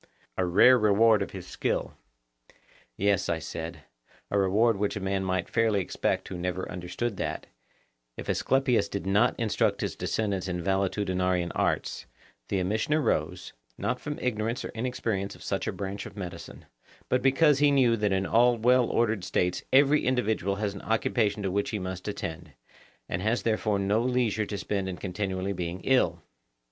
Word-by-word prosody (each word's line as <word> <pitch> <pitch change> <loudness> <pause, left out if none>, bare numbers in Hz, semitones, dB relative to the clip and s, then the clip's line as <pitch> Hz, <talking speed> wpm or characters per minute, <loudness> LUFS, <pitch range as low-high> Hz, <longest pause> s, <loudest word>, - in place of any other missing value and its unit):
A 95 - 0
rare 120 +8 +6
reward 110 0 +4
of 100 - -2
his 95 -2 -8
skill! 90 - -2 1.0
Yes, 100 -2 +1
I 85 - +1
said; 80 0 -6 0.5
a 100 - +2
reward 105 +4 +3
which 100 +1 -1
a - - -3
man 95 0 -1
might 95 -1 -1
fairly 115 -3 +2
expect 90 - -1
who 90 - -6
never 90 +1 -3
understood 95 +5 -4
that, - - -3 0.7
if - - -7
Asclepius 130 -6 +1
did 100 -1 -4
not 105 +7 +2
instruct 110 -2 +1
his - - -2
descendants 100 -4 -2
in 90 -1 -2
valetudinarian 95 -2 0
arts, - - -1 0.4
the 100 - 0
omission 110 +10 0
arose, 90 - -1 0.2
not 125 0 -2
from 150 0 -5
ignorance 115 -1 -2
or - - -5
inexperience 115 -4 -3
of - - -14
such - - -2
a - - 0
branch 100 0 -5
of - - -13
medicine, 90 -3 -8 0.4
but 125 - +1
because 135 +2 +4
he 145 0 +5
knew 130 -5 +4
that 105 -2 0
in 95 0 +1
all 120 +3 +4
well 125 +2 +4
ordered 110 -5 +1
states 90 0 0
every 140 +2 +5
individual 110 -6 +1
has 105 -1 -2
an 100 - -8
occupation 110 -2 0
to 95 - -1
which 100 +2 0
he 110 - -2
must 95 0 -5
attend, 85 -6 -5 0.5
and 85 - -3
has 110 +4 0
therefore 110 -2 +1
no 100 +3 +1
leisure 120 -4 0
to 100 - -4
spend 100 -1 -2
in 90 - -5
continually 95 0 -3
being 90 0 -4
ill. 85 -11 +2
100 Hz, 170 wpm, -28 LUFS, 95-115 Hz, 1.0 s, rare